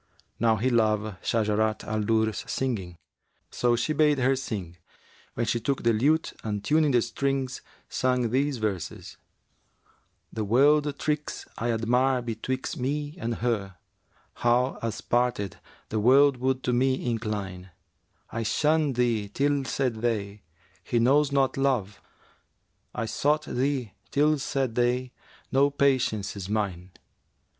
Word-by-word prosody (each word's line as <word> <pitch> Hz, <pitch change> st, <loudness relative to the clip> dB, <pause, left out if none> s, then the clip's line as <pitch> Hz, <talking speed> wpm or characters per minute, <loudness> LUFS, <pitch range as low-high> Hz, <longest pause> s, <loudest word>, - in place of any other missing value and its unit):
Now 115 Hz, -1 st, +3 dB
he 125 Hz, +5 st, 0 dB
loved 110 Hz, -3 st, +1 dB
Shajarat 110 Hz, -1 st, +1 dB
al 110 Hz, 0 st, -2 dB
Durr's 110 Hz, 0 st, +1 dB
singing: 100 Hz, -10 st, -2 dB, 0.5 s
so 120 Hz, -1 st, +2 dB
he 120 Hz, +6 st, 0 dB
bade 150 Hz, -1 st, +3 dB
her 130 Hz, +1 st, +2 dB
sing, 100 Hz, -10 st, -5 dB, 0.6 s
when 120 Hz, -, 0 dB
she 120 Hz, -, 0 dB
took 135 Hz, +4 st, -2 dB
the 115 Hz, -1 st, +3 dB
lute 150 Hz, +9 st, +2 dB
and 105 Hz, -2 st, -3 dB
tuning 155 Hz, +4 st, +3 dB
the 120 Hz, -4 st, +3 dB
strings 135 Hz, -2 st, -2 dB, 0.3 s
sang 125 Hz, -3 st, 0 dB
these 135 Hz, +1 st, +1 dB
verses, 105 Hz, -6 st, -4 dB, 1.2 s
'The 110 Hz, -, -2 dB
world 145 Hz, +6 st, +3 dB
tricks 150 Hz, 0 st, -2 dB
I 120 Hz, -, -1 dB
admire 125 Hz, +3 st, +1 dB
betwixt 120 Hz, +4 st, -4 dB
me 145 Hz, +3 st, -2 dB
and 115 Hz, -5 st, -2 dB
her; 100 Hz, -6 st, -1 dB, 0.3 s
* -, -, -37 dB
How, 125 Hz, +2 st, +2 dB
us 115 Hz, -2 st, -3 dB
parted, 120 Hz, -6 st, 0 dB, 0.3 s
the 110 Hz, -, -1 dB
World 135 Hz, +4 st, +5 dB
would 130 Hz, +1 st, -1 dB
to 125 Hz, -, 0 dB
me 130 Hz, +1 st, +1 dB
incline: 100 Hz, -5 st, -3 dB, 0.6 s
I 115 Hz, -, -3 dB
shunned 150 Hz, +4 st, +1 dB
thee 115 Hz, -4 st, +1 dB
till 140 Hz, +4 st, 0 dB
said 125 Hz, -2 st, -1 dB
they, 105 Hz, -3 st, -2 dB, 0.4 s
'He 120 Hz, -, -1 dB
knows 140 Hz, +5 st, +4 dB
not 135 Hz, -1 st, +1 dB
Love;' 125 Hz, -8 st, 0 dB, 0.5 s
* -, -, -34 dB
I 115 Hz, -, -1 dB
sought 150 Hz, +7 st, +1 dB
thee 130 Hz, -5 st, -1 dB, 0.2 s
till 150 Hz, +1 st, +2 dB
said 135 Hz, -3 st, -1 dB
they, 125 Hz, +1 st, 0 dB, 0.4 s
'No 140 Hz, +2 st, +4 dB
patience 130 Hz, -8 st, +1 dB
is 100 Hz, -1 st, -6 dB
mine!' 95 Hz, -4 st, -2 dB
120 Hz, 140 wpm, -27 LUFS, 110-135 Hz, 1.2 s, World